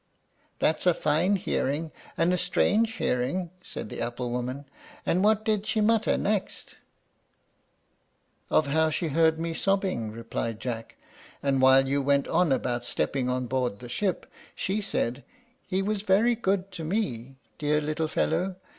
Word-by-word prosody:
'" - - -40
"That's 160 +3 +1
a 175 - +5
fine 165 +7 +2
hearing, 155 -3 -1 0.3
and 170 +2 +3
a - - +3
strange 210 +5 +2
hearing," 165 - -1
said 145 - -7
the - - -6
apple 120 +1 -3
woman; 125 +3 -3 0.4
"and 185 +3 +2
what 215 0 +3
did 215 -1 0
she 220 - +1
mutter 220 +1 +3
next?" 205 -1 -2 1.7
"Of 155 - +3
how 160 +3 +2
she 160 +1 -1
heard 160 +2 +3
me 165 0 -2
sobbing," 190 - 0
replied 115 0 -4
Jack; 115 -2 -5 0.5
"and 135 -2 +2
while 130 0 +6
you 140 +1 +1
went 140 0 +2
on 180 -5 +2
about 120 -2 0
stepping 125 +1 -1
on 125 0 -1
board 125 -4 -1
the 120 +2 -10
ship, 190 +7 -1 0.3
she 200 +3 -1
said, 125 - -2 0.4
'He 190 0 0
was 205 0 -1
very 210 +4 +3
good 195 -4 -1
to 170 -3 -7
me, 135 - -2 0.2
dear 150 0 +2
little 155 +1 -1
fellow! 185 +4 0
160 Hz, 155 wpm, -27 LUFS, 130-195 Hz, 1.7 s, while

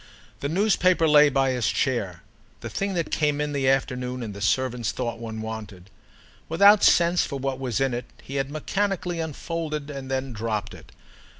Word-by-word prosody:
The 140 - -3
newspaper 185 -2 +3
lay 150 -1 +7
by 135 -1 +2
his 125 -3 0
chair—the 100 - -4
thing 195 -1 -2
that 170 -2 -2
came 150 -2 +1
in 150 0 -2
the 135 -2 +1
afternoon 125 -2 -1
and 105 -3 -6
the 100 - -9
servants 120 +1 0
thought 120 -2 -4
one 110 -1 -6
wanted; 105 -4 -8 0.6
without 200 +6 +6
sense 170 0 +4
for 140 - -4
what 135 -1 -3
was 125 -5 -2
in 135 -2 +1
it 120 0 -3 0.2
he 140 - -5
had 135 0 -1
mechanically 180 +3 -2
unfolded 155 -1 -4
and 135 -2 -7
then 130 -1 -2
dropped 110 -1 -3
it. - - -14
135 Hz, 175 wpm, -25 LUFS, 120-160 Hz, 0.6 s, lay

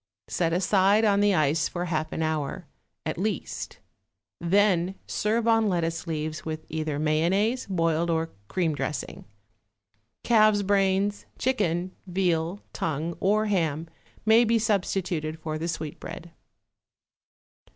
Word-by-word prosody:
Set 165 -2 0
aside 195 +4 +3
on 200 -1 +4
the 205 -1 +4
ice 155 +1 +2
for 175 0 -3
half 155 -2 -2
an 160 - -2
hour, 155 -3 -2 0.4
at - - -3
least; - - -3 0.6
then 185 0 +2
serve 225 +2 0
on 225 -2 +4
lettuce 165 -3 -1
leaves 155 -1 -3
with 155 0 -5
either 155 -2 -2
mayonnaise, 175 - +1
boiled 165 -2 +1
or 165 0 0 0.2
cream 170 - 0
dressing. 145 -2 -4 1.0
Calf's 215 -3 +4
brains, 195 +1 +1
chicken, 185 -8 0 0.2
veal, 180 0 0
tongue 160 +2 -2
or 210 +3 +2
ham 165 -6 0 0.4
may 220 +2 +6
be 230 0 +3
substituted 185 -7 -1
for 155 -1 -4
the 165 - -2
sweetbread. 165 +1 -6
175 Hz, 120 wpm, -26 LUFS, 160-205 Hz, 1.0 s, may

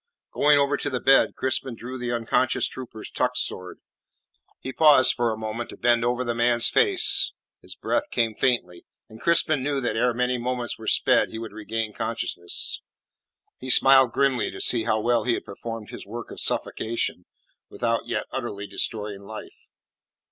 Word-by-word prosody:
Going 145 0 +4
over 140 0 +2
to - - -2
the 130 -2 -2
bed, 135 +2 +4
Crispin 130 -1 -2
drew 125 +3 -8
the 120 -1 -3
unconscious 120 +2 +1
trooper's 120 -4 -8
tuck - - 0
sword. 90 0 -2 0.8
He 130 - -7
paused 150 -4 +5
for 120 -2 0
a 110 - -4
moment 110 +2 -5
to - - -10
bend 120 -1 +2
over 120 +1 0
the 120 -1 -2
man's 120 0 +3
face; 400 -5 +3 0.3
his - - -8
breath 295 +1 -2
came 115 -2 0
faintly, 105 -9 -1 0.3
and 110 0 -14
Crispin 160 -3 +2
knew 140 +1 -1
that 125 - -2
ere 120 +1 +1
many 125 0 0
moments 125 -1 -3
were 110 - -9
sped - - +3
he - - -7
would 115 0 -7
regain 110 0 -4
consciousness. 110 -7 -2 0.8
He 130 - -7
smiled 130 -1 +6
grimly 135 -3 +1
to - - -9
see 115 -3 +2
how 110 -1 +1
well 115 0 +1
he 120 0 +1
had - - -7
performed 115 +2 -8
his - - -8
work 115 +4 -8
of - - -8
suffocation 110 -5 -2 0.4
without - - -2
yet - - -2
utterly 100 0 -5
destroying 105 -1 -2
life. 110 +2 -11
120 Hz, 175 wpm, -24 LUFS, 110-130 Hz, 0.8 s, smiled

